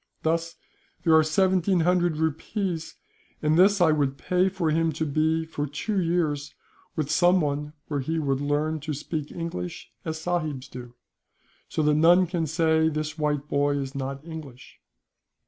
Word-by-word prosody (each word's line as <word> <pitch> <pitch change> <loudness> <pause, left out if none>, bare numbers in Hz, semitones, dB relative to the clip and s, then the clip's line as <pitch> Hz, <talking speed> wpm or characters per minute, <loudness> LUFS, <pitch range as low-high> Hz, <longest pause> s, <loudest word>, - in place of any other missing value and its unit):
Thus 165 +1 0 0.5
there 165 - +4
are 160 - +7
seventeen 185 +2 +2
hundred 175 -1 +2
rupees, 160 +2 -2 0.5
and 155 +1 +3
this 195 +3 +5
I 170 -3 +5
would 140 -3 0
pay 180 +4 +1
for 180 -4 -1
him 165 +1 +2
to 160 +2 -2
be, 160 +2 +1
for 150 -2 -4
two 190 +8 -2
years, 155 -4 -1 0.4
with 155 -2 -2
someone 150 -4 +2
where 145 -2 -2
he 160 +5 -2
would 140 -3 0
learn 150 +2 0
to 150 0 -4
speak 150 +1 -4
English 125 - -5
as 160 0 -3
sahibs 155 -6 -2
do, 120 -1 -9 0.7
so 155 - -1
that 150 0 +3
none 170 +4 +5
can 170 -2 -2
say 160 0 +2
this 155 0 -4
white 150 -1 0
boy 145 0 +1
is 135 -1 -4
not 135 +1 -5
English. 150 -6 -10
155 Hz, 160 wpm, -26 LUFS, 145-170 Hz, 0.7 s, are